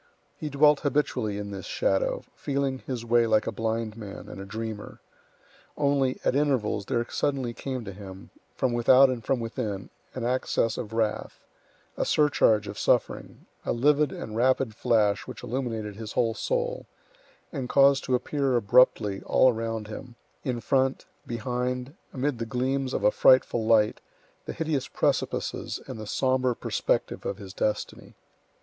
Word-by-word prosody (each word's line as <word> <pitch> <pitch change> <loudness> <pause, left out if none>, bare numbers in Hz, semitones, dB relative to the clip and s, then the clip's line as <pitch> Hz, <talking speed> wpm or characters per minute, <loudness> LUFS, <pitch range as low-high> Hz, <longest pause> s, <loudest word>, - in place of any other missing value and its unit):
He 155 - -5
dwelt 150 0 +5
habitually 125 -7 0
in 100 0 -5
this 95 -1 -7
shadow, - - 0
feeling 140 -2 -2
his 120 -3 -4
way 120 0 +3
like 110 -1 +3
a - - -2
blind 115 -1 -2
man 105 -3 -9
and 95 - -8
a - - -7
dreamer. 110 +1 -6 0.8
Only, 140 -3 +1
at - - +2
intervals, 130 -8 +1
there 120 -3 0
suddenly 135 -4 -1
came 130 -1 -5
to 100 - -6
him, 95 -1 -11 0.2
from 130 -2 0
without 130 +3 +6
and 120 -3 -4
from 130 +3 0
within, 115 -4 -4 0.2
an 130 - -4
access 120 -2 0
of 105 - -5
wrath, 110 -1 -2 0.5
a - - +1
surcharge 115 -8 +3
of - - -6
suffering, - - 0 0.2
a - - -1
livid 145 +3 +3
and 110 - -7
rapid 130 0 +2
flash 105 -3 +1
which - - -9
illuminated 115 -5 -3
his 110 -2 -7
whole 115 -2 +1
soul, - - -2 0.7
and 130 -5 -4
caused 140 0 +5
to 130 - +2
appear 135 0 0
abruptly 105 -3 +3
all 130 -1 +5
around 115 -1 -3
him, 120 +3 -9 0.3
in 125 -2 -2
front, 135 +3 +1 0.2
behind, 125 +3 -3 0.2
amid 135 -2 -2
the 115 - -3
gleams 130 +2 -1
of - - -2
a 105 - +5
frightful 120 -3 +4
light, 110 -2 +3 0.4
the - - -5
hideous 155 -5 -1
precipices - - -1
and - - -7
the 110 - -7
sombre 130 +1 +1
perspective - - -1
of 100 - -3
his 100 -3 -10
destiny. 105 0 -3
120 Hz, 155 wpm, -27 LUFS, 110-135 Hz, 0.8 s, without